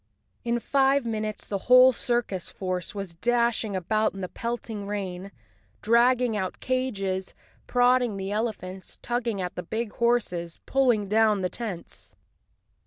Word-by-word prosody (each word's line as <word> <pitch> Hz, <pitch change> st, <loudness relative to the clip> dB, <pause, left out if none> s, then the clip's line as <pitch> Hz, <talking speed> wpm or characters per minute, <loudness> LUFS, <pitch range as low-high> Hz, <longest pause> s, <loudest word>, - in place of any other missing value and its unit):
In 235 Hz, 0 st, 0 dB
five 275 Hz, +1 st, +2 dB
minutes 215 Hz, -2 st, -3 dB
the 200 Hz, -, -3 dB
whole 255 Hz, +1 st, +9 dB
circus 240 Hz, -7 st, -2 dB
force 185 Hz, 0 st, -4 dB
was 195 Hz, -4 st, -4 dB
dashing 235 Hz, +1 st, +1 dB
about 215 Hz, +4 st, 0 dB
in 195 Hz, -, -6 dB
the 185 Hz, -, -2 dB
pelting 230 Hz, -3 st, -4 dB
rain, 195 Hz, -2 st, -4 dB, 0.5 s
dragging 235 Hz, +1 st, +4 dB
out 190 Hz, -3 st, -3 dB
cages, 195 Hz, -8 st, -2 dB, 0.3 s
prodding 245 Hz, -3 st, +3 dB
the 195 Hz, 0 st, -4 dB
elephants, 205 Hz, -4 st, -4 dB
tugging 240 Hz, -4 st, -1 dB
at 180 Hz, -1 st, -3 dB
the -, -, -4 dB
big 220 Hz, +5 st, -3 dB
horses, 205 Hz, -8 st, 0 dB
pulling 245 Hz, -7 st, +2 dB
down 215 Hz, -1 st, +3 dB
the 180 Hz, -, 0 dB
tents. 205 Hz, -7 st, -5 dB
215 Hz, 135 wpm, -26 LUFS, 190-240 Hz, 0.5 s, whole